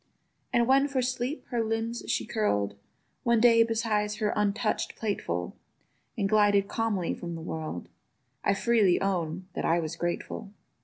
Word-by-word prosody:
And 240 Hz, -2 st, +3 dB
when 270 Hz, +3 st, +4 dB
for 270 Hz, -3 st, 0 dB
sleep 255 Hz, +4 st, -2 dB
her 235 Hz, -3 st, 0 dB
limbs 225 Hz, +1 st, -2 dB
she -, -, 0 dB
curl'd 105 Hz, -, 0 dB, 0.5 s
One 235 Hz, -1 st, +3 dB
day 230 Hz, 0 st, +6 dB
beside 220 Hz, -2 st, +1 dB
her 215 Hz, -2 st, 0 dB
untouch'd 210 Hz, +2 st, 0 dB
plateful, 90 Hz, -, -3 dB, 0.6 s
And 200 Hz, -3 st, +1 dB
glided 205 Hz, -1 st, +4 dB
calmly 210 Hz, -7 st, -1 dB
from 170 Hz, -1 st, -6 dB
the -, -, -6 dB
world, 160 Hz, -, -5 dB, 0.6 s
I 200 Hz, -, +3 dB
freely 210 Hz, -4 st, +3 dB
own 185 Hz, -2 st, -1 dB
that -, -, -3 dB
I 165 Hz, +1 st, +3 dB
was 160 Hz, 0 st, -3 dB
grateful. 175 Hz, +4 st, -4 dB
210 Hz, 150 wpm, -28 LUFS, 175-230 Hz, 0.6 s, day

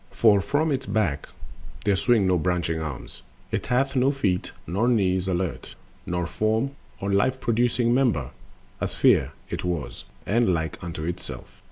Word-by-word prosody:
For 100 Hz, 0 st, +4 dB
from 145 Hz, +9 st, +1 dB
its 135 Hz, -6 st, -2 dB
back 100 Hz, -8 st, 0 dB, 0.6 s
there 100 Hz, -1 st, +3 dB
swing 110 Hz, 0 st, +3 dB
no 90 Hz, -1 st, +3 dB
branching 85 Hz, -1 st, 0 dB
arms, 75 Hz, -5 st, -6 dB, 0.3 s
It -, -, -2 dB
hath 135 Hz, +3 st, +1 dB
no 130 Hz, +1 st, +4 dB
feet 100 Hz, -11 st, 0 dB
nor 100 Hz, +9 st, 0 dB
knees 95 Hz, -6 st, +2 dB
alert, 90 Hz, -1 st, -2 dB, 0.3 s
nor 90 Hz, 0 st, -1 dB
form 110 Hz, +8 st, 0 dB, 0.3 s
Of 100 Hz, 0 st, -1 dB
life 130 Hz, +7 st, +2 dB
producing 120 Hz, 0 st, +2 dB
member,—on 115 Hz, -, +1 dB
all -, -, -28 dB
sides -, -, -8 dB
A -, -, -13 dB
sphere -, -, +4 dB, 0.2 s
it -, -, -3 dB
was, 80 Hz, -9 st, -3 dB, 0.2 s
and 110 Hz, -4 st, +3 dB
like 80 Hz, +1 st, -4 dB
unto 85 Hz, -2 st, -5 dB
itself. 85 Hz, +2 st, -6 dB
100 Hz, 165 wpm, -25 LUFS, 90-120 Hz, 0.6 s, For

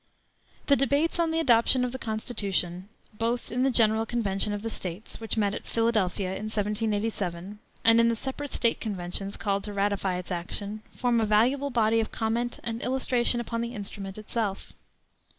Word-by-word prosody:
The 280 Hz, -, +5 dB
debates 285 Hz, +6 st, +1 dB
on 335 Hz, -1 st, +3 dB
the 325 Hz, 0 st, 0 dB
adoption 250 Hz, -2 st, +4 dB
of 245 Hz, -, -3 dB
the 260 Hz, -, -6 dB
Constitution, 200 Hz, -5 st, -2 dB, 0.2 s
both 230 Hz, +2 st, -2 dB
in 245 Hz, +2 st, 0 dB
the 270 Hz, -, +4 dB
General 225 Hz, -2 st, +3 dB
Convention 210 Hz, -3 st, +1 dB
of 205 Hz, 0 st, -3 dB
the 225 Hz, -, -2 dB
States, 185 Hz, +2 st, -5 dB
which 225 Hz, 0 st, 0 dB
met 205 Hz, -2 st, +2 dB
at -, -, -6 dB
Philadelphia 215 Hz, -5 st, +1 dB
in 190 Hz, +3 st, -4 dB
1787, 210 Hz, -3 st, -2 dB, 0.3 s
and 230 Hz, 0 st, +7 dB
in 230 Hz, -, +5 dB
the 230 Hz, -, +2 dB
separate 270 Hz, +4 st, -5 dB
State 235 Hz, -1 st, +1 dB
Conventions 195 Hz, -1 st, -3 dB
called 200 Hz, -2 st, -1 dB
to 210 Hz, -, -5 dB
ratify 200 Hz, -2 st, 0 dB
its 180 Hz, 0 st, -7 dB
action, 200 Hz, +4 st, -4 dB
form 240 Hz, -2 st, +2 dB
a -, -, +2 dB
valuable 250 Hz, +7 st, +3 dB
body 225 Hz, -3 st, +3 dB
of 220 Hz, -, -1 dB
comment 235 Hz, +2 st, -1 dB
and 230 Hz, 0 st, -3 dB
illustration 250 Hz, -2 st, +3 dB
upon 230 Hz, 0 st, -3 dB
the 235 Hz, +1 st, -4 dB
instrument 200 Hz, -1 st, -6 dB
itself. 215 Hz, -2 st, -3 dB
220 Hz, 175 wpm, -27 LUFS, 200-240 Hz, 0.3 s, and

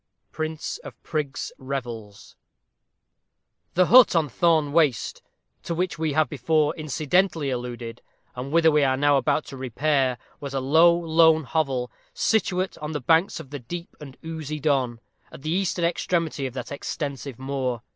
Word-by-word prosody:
Prince 155 Hz, 0 st, -4 dB
of -, -, -10 dB
Prigs' 145 Hz, -3 st, -3 dB
Revels. 120 Hz, -6 st, -6 dB, 1.4 s
The 180 Hz, +1 st, +5 dB
hut 245 Hz, 0 st, +7 dB
on 160 Hz, -3 st, +2 dB
Thorne 155 Hz, +1 st, +2 dB
Waste, 150 Hz, -8 st, +1 dB, 0.4 s
to 170 Hz, -, -4 dB
which 180 Hz, -1 st, -2 dB
we 160 Hz, -2 st, 0 dB
have 155 Hz, 0 st, +3 dB
before 150 Hz, +3 st, +1 dB
incidentally 155 Hz, +1 st, 0 dB
alluded, 120 Hz, -2 st, -5 dB, 0.3 s
and 130 Hz, +2 st, -5 dB
whither 165 Hz, 0 st, +5 dB
we 150 Hz, -1 st, +3 dB
are 130 Hz, -1 st, +2 dB
now 145 Hz, 0 st, +4 dB
about 145 Hz, +2 st, +1 dB
to 135 Hz, -, -9 dB
repair, 130 Hz, 0 st, 0 dB, 0.2 s
was 140 Hz, -1 st, -6 dB
a -, -, +1 dB
low, 160 Hz, +6 st, +5 dB
lone 160 Hz, -1 st, +4 dB
hovel, 135 Hz, -5 st, -1 dB, 0.2 s
situate 190 Hz, -4 st, 0 dB
on 150 Hz, +1 st, -5 dB
the 150 Hz, -, -2 dB
banks 165 Hz, +8 st, +2 dB
of 145 Hz, -4 st, -11 dB
the 145 Hz, -, -5 dB
deep 170 Hz, +8 st, -8 dB
and 135 Hz, -3 st, -11 dB
oozy 155 Hz, -2 st, -5 dB
Don, 130 Hz, -5 st, 0 dB, 0.3 s
at -, -, -12 dB
the 155 Hz, -, -2 dB
eastern 180 Hz, -1 st, 0 dB
extremity 165 Hz, -4 st, -1 dB
of 130 Hz, -, -10 dB
that 125 Hz, -, -6 dB
extensive 140 Hz, -3 st, -5 dB
moor. 130 Hz, -3 st, -3 dB
150 Hz, 155 wpm, -24 LUFS, 130-160 Hz, 1.4 s, hut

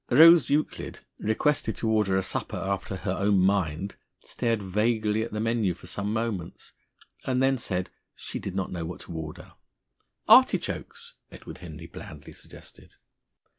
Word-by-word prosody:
Rose 160 Hz, +2 st, +8 dB
Euclid, 150 Hz, +2 st, -1 dB, 0.2 s
requested 110 Hz, 0 st, +1 dB
to 115 Hz, -, -2 dB
order 105 Hz, -4 st, +2 dB
a 95 Hz, -, +1 dB
supper -, -, -3 dB
after 100 Hz, 0 st, -3 dB
her 95 Hz, 0 st, -3 dB
own 100 Hz, +1 st, +2 dB
mind, 95 Hz, -1 st, +1 dB, 0.2 s
stared 115 Hz, -4 st, -2 dB
vaguely 105 Hz, +2 st, +1 dB
at 115 Hz, -, -4 dB
the 105 Hz, -, -3 dB
menu 110 Hz, -5 st, +1 dB
for 90 Hz, -, -15 dB
some 100 Hz, +3 st, -3 dB
moments, 110 Hz, -6 st, -4 dB, 0.5 s
and 130 Hz, -1 st, +1 dB
then 135 Hz, +1 st, +3 dB
said 95 Hz, -7 st, -2 dB
that -, -, -21 dB, 0.2 s
she -, -, -6 dB
did 95 Hz, -, -6 dB
not 95 Hz, -1 st, -2 dB
know 85 Hz, -2 st, -4 dB
what 85 Hz, +2 st, -6 dB
to -, -, -9 dB
order. 80 Hz, -2 st, -7 dB, 0.7 s
"Artichokes?" -, -, +3 dB, 0.2 s
Edward -, -, -10 dB
Henry 80 Hz, -2 st, -9 dB
blandly 85 Hz, -3 st, -10 dB
suggested. -, -, -13 dB
100 Hz, 155 wpm, -27 LUFS, 90-115 Hz, 0.7 s, Rose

